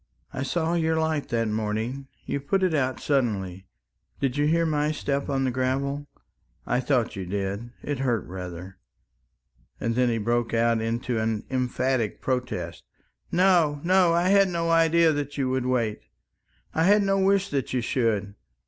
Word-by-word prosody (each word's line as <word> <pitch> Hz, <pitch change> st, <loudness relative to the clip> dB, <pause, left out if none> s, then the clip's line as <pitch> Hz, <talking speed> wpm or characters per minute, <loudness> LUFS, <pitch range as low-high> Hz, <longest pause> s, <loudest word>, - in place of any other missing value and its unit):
"I -, -, -4 dB
saw 160 Hz, +5 st, 0 dB
your 160 Hz, -1 st, +1 dB
light 160 Hz, -2 st, -1 dB
that 115 Hz, -1 st, 0 dB
morning... 110 Hz, +5 st, -2 dB, 0.2 s
you 140 Hz, -, -2 dB
put 190 Hz, +8 st, 0 dB
it 185 Hz, -3 st, +2 dB
out 130 Hz, -4 st, 0 dB
suddenly... 100 Hz, -9 st, -1 dB, 0.5 s
did 135 Hz, -2 st, 0 dB
you 145 Hz, 0 st, +2 dB
hear 165 Hz, +2 st, +2 dB
my 150 Hz, -1 st, +1 dB
step 140 Hz, -2 st, -2 dB
on 135 Hz, -1 st, 0 dB
the 130 Hz, -, +1 dB
gravel?... 135 Hz, +3 st, -1 dB, 0.6 s
I 125 Hz, -, +1 dB
thought 125 Hz, -2 st, 0 dB
you 95 Hz, -, -4 dB
did, 100 Hz, +4 st, -3 dB
it 145 Hz, -2 st, -3 dB
hurt 120 Hz, -4 st, 0 dB
rather," 90 Hz, 0 st, -8 dB, 1.0 s
and 115 Hz, -, -1 dB
then 125 Hz, +1 st, +2 dB
he 115 Hz, -, 0 dB
broke 120 Hz, +1 st, 0 dB
out 115 Hz, 0 st, +2 dB
into 115 Hz, +1 st, -1 dB
an 110 Hz, -1 st, -1 dB
emphatic 130 Hz, -2 st, 0 dB
protest. 125 Hz, -10 st, -3 dB, 0.5 s
"No, 175 Hz, -5 st, +3 dB
no, 180 Hz, 0 st, +4 dB
I 170 Hz, +2 st, +2 dB
had 200 Hz, 0 st, +5 dB
no 165 Hz, -1 st, -1 dB
idea 165 Hz, 0 st, +4 dB
that 145 Hz, -1 st, -3 dB
you 130 Hz, -2 st, 0 dB
would 130 Hz, -1 st, -1 dB
wait. 115 Hz, -4 st, 0 dB, 0.7 s
I 160 Hz, -, +2 dB
had 205 Hz, +2 st, +5 dB
no 195 Hz, 0 st, +2 dB
wish 195 Hz, 0 st, +2 dB
that 140 Hz, -3 st, -2 dB
you 125 Hz, -, 0 dB
should. 110 Hz, -4 st, 0 dB
130 Hz, 165 wpm, -26 LUFS, 115-160 Hz, 1.0 s, had